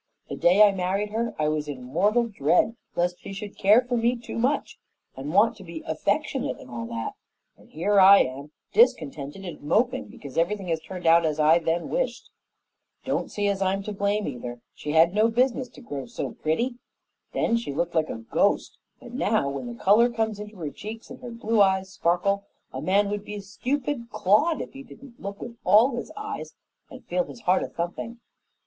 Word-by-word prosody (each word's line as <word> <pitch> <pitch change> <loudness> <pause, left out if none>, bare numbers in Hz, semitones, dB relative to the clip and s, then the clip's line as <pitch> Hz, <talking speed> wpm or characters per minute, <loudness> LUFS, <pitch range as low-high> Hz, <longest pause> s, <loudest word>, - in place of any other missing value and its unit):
The - - -4
day 185 +5 +5
I 205 - +7
married 195 +2 -1
her 230 +1 -2
I 155 - +1
was 150 -1 -1
in 135 -4 -6
mortal 200 - +2
dread 195 +3 +2 0.2
lest 175 +1 0
she - - -8
should 200 +1 -7
care 210 +5 +5
for 250 0 -2
me 235 +1 +2
too 235 -1 -6
much 260 +5 0 0.4
and 135 +3 -5
want 220 +6 +4
to 195 - -11
be 165 -2 -8
affectionate 205 - -1
and 125 - -13
all 115 -1 -5
that; 115 -1 -4 0.4
and - - -21
here 200 +6 +2
I 195 +1 +9
am, 135 +3 -4 0.2
discontented 155 - +2
and 175 - -7
moping 245 - +1
because 140 +1 -6
everything 190 +2 -1
has 165 -1 0
turned 180 +2 -9
out 165 +1 +6
as 155 -1 -1
I 155 +2 +5
then 165 +1 -1
wished. - - -2 0.7
Don't - - -1
see 205 -1 -1
as 200 -1 0
I'm 195 +1 0
to 210 - -5
blame, 200 +1 0
either. 120 -2 -6
She 150 - -5
had 165 +2 +5
no 215 +2 +4
business 250 +2 +1
to 255 - -15
grow 140 - -6
so - - -4
pretty. 240 +11 -1 0.5
Then 230 - +1
she 230 -10 -2
looked 170 +4 -2
like 160 -2 +1
a - - -3
ghost, 115 - 0 0.2
but - - -12
now - - +1
when 140 - -5
the 240 - -6
color 220 +5 +5
comes 220 -3 -2
into 210 +1 -8
her 160 -6 -5
cheeks, 220 +6 -9
and 250 - -9
her 245 - -7
blue 230 -2 +1
eyes 190 -1 +3
sparkle, 200 +2 +1 0.3
a 130 - -4
man 200 +5 +2
would 205 0 -3
be 210 - -7
a 205 - -5
stupid 245 +4 -3
clod 215 - +2
if - - -8
he 270 - -9
didn't 270 -2 -14
look 200 +1 -6
with 235 0 -8
all 235 +5 +5
his 240 - -5
eyes 425 0 -6 0.3
and - - -12
feel - - 0
his 235 - -11
heart 185 -2 +3
a - - -2
thumping. 175 +7 -5
200 Hz, 205 wpm, -25 LUFS, 165-230 Hz, 0.7 s, I